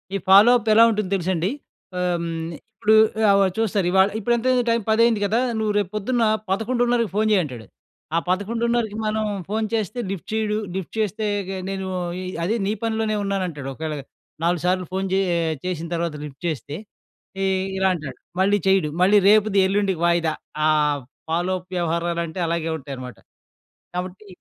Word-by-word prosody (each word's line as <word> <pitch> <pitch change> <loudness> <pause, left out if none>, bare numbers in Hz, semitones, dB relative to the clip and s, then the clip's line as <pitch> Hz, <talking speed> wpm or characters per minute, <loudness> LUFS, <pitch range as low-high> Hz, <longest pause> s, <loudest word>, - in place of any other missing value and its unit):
ఈ - - +2
follow 200 +5 +8
up 225 -2 -3
ఎలా 225 +2 +7
ఉంటుందో 210 -4 -2
తెలుసండి. 180 -1 0 0.5
ఆహ్, 180 -1 +1
హ్మ్. 170 - -3 0.5
ఇప్పుడు 215 0 +5 0.4
ఆవ 200 0 +5
చూస్తారు 210 -4 +1
ఇవాళ, 190 +1 +5
ఇప్పుడెంతైంది 240 +3 +2
టైము 230 -1 +1
పదయ్యింది 225 0 +4
కదా! 220 +4 +1 0.2
నువ్వు 215 -1 0
రేపొద్దున్న 210 +5 0 0.3
11:30కి 235 +2 +1
ఫోన్ 215 +1 +2
చెయ్యంటాడు. 135 - -1 0.5
ఆ - - +4
11:30కి 225 +3 0
మనం 215 0 0 0.2
ఫోన్ 220 +1 0
చేస్తే 220 +1 -1
లిఫ్ట్ 195 -4 -6
చేయడు. 215 -1 0 0.2
లిఫ్ట్ 190 -3 -5
చేస్తే 215 0 -1 0.2
ఇగే 190 0 -5
నేను 190 -1 -3 0.4
ఈ - - -6 0.2
అదే 205 +7 0
నీ 200 - 0
పనిలోనే 220 -1 0
ఉన్నానంటాడు. 180 -8 -3
ఒకవేళ 155 +2 -4 0.5
4 170 -1 +1
సార్లు 185 0 +1
ఫోను 190 +1 -1
చే 190 - +3 0.5
చేసిన 170 -2 -3
తర్వాత 170 -2 -2
లిఫ్ట్ 140 -2 -11
చేస్తే 150 -2 -4 0.7
ఏ - - +2 0.3
ఇలా 190 0 +2
అంటాడు. 155 -6 -6 0.2
మళ్ళీ 200 +2 +4
చేయడు. 190 -5 +3
మళ్ళీ 195 +3 +6
రేపుది, 210 -1 +4
ఎల్లుండికి 195 -3 0
వాయిదా. 170 -2 +2 0.3
ఆహ్, 150 -2 +2 0.3
ఫాలో 175 +3 0
అప్ 180 +1 -22
వ్యవహారాలంటే 170 0 -1
అలాగే 165 -1 -1
ఉంటాయనమాట. 130 -5 -8 0.8
కాబట్టి 185 +3 -5
190 Hz, 150 wpm, -22 LUFS, 170-215 Hz, 0.8 s, ఫాలో